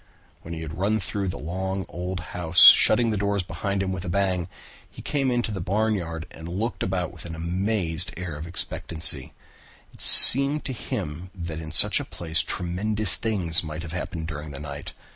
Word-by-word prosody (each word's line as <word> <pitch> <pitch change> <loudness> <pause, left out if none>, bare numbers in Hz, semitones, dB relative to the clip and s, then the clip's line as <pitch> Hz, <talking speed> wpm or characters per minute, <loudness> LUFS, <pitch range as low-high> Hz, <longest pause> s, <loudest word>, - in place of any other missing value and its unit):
When 85 0 -9
he 80 - -8
had 80 +1 -9
run 105 +3 0
through 100 0 -5
the 90 - -5
long 95 +4 -5
old 90 +1 -6
house, 85 -1 +2
shutting 115 +1 +2
the 105 - -2
doors 100 -1 -2
behind 100 +1 -4
him 95 - -4
with 95 -1 -6
a 90 - -6
bang, 90 -2 -2 0.4
he - - -14
came 140 -3 -2
into 120 -2 -2
the 95 -3 -6
barnyard 95 -4 -3
and 80 0 -11
looked 105 +7 -5
about 90 -2 -3
with 85 - -12
an 80 -1 -8
amazed 90 0 -2
air 90 -3 -7
of 75 +3 -9
expectancy. 80 -3 0 0.6
It - - -15
seemed 140 +3 +9
to 135 - -5
him 85 -6 -7
that 85 -3 -7
in 80 -1 -9
such 80 - +5
a - - -5
place 85 0 -3
tremendous 100 +2 -1
things 90 -7 0
might 80 +1 -8
have 85 -1 -9
happened 85 -2 -6
during 75 -1 -8
the 70 -1 -9
night. 70 -1 -9
90 Hz, 190 wpm, -23 LUFS, 80-100 Hz, 0.6 s, seemed